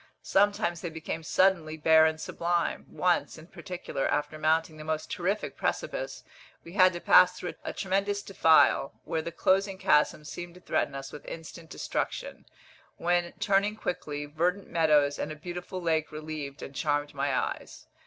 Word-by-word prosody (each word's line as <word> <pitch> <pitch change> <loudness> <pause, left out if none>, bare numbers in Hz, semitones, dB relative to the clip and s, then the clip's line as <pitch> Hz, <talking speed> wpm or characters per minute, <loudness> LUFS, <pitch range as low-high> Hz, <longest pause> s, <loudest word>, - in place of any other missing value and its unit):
Sometimes 205 -4 +2
they 175 - -3
became 160 0 -5
suddenly 165 -2 +2
bare 160 +1 +6
and 160 0 -2
sublime. 170 +1 -1
Once, 180 -2 0
in 155 - -12
particular, 175 -5 -4
after 145 +1 -1
mounting 160 0 +1
the 155 - -8
most 155 0 -3
terrific 195 +4 -2
precipice, - - -3 0.4
we 170 - -11
had 185 -2 +6
to 175 - -4
pass 180 +1 +6
through 180 - -5
a - - -3
tremendous 200 +1 -1
defile, 160 -6 +4
where 160 - -2
the 170 - -5
closing 190 +3 +1
chasm 150 -3 +2
seemed 175 +3 -7
to - - -13
threaten 175 - -1
us 135 0 -6
with 150 - -9
instant 165 0 -9
destruction, - - -4 0.5
when, 175 0 +1
turning 200 +1 +1
quickly, 150 -8 -4
verdant 175 +6 -1
meadows 150 -4 +3
and 150 - -3
a - - -5
beautiful 180 +3 -6
lake 160 -3 0
relieved 155 -2 -6
and 135 - -8
charmed 145 +1 -1
my - - -1
eyes. - - -4
165 Hz, 165 wpm, -28 LUFS, 155-185 Hz, 0.5 s, bare